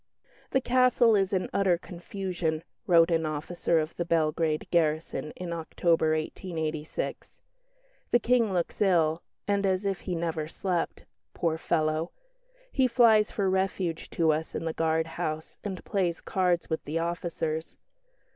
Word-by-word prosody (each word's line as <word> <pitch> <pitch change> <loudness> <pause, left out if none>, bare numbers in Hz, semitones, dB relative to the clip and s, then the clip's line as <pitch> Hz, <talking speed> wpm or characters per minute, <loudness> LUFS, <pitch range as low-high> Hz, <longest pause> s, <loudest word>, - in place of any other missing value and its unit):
"The 265 - +2
castle 250 -2 +4
is 195 -2 +2
in 185 -2 0
utter 190 -3 +3
confusion," 175 -2 -4 0.2
wrote 170 -1 +6
an 165 -1 +2
officer 160 +2 -1
of 155 0 -1
the 175 - 0
Belgrade 160 -1 +1
garrison, 155 -2 +1
in 175 -2 -5
October, 165 -1 +1
1886. 155 -1 -4 0.7
"The - - +5
King 235 -2 +2
looks 180 +1 -2
ill, 170 -4 +3 0.3
and 200 -1 +1
as 190 0 +1
if 195 -2 0
he 180 - -3
never 165 -2 -2
slept. 175 0 -2 0.3
Poor 160 -2 0
fellow! 155 0 0 0.6
he 265 -2 +3
flies 230 -3 +5
for 200 -2 -1
refuge 190 -3 -1
to 165 -2 +2
us 155 +1 -2
in - - -3
the 160 - -1
guard 160 0 +1
house, 160 -1 -5
and 190 -3 -5
plays 180 -4 0
cards 180 -2 0
with 160 - -2
the 155 +3 -2
officers. 165 -1 -3
170 Hz, 145 wpm, -28 LUFS, 160-190 Hz, 0.7 s, wrote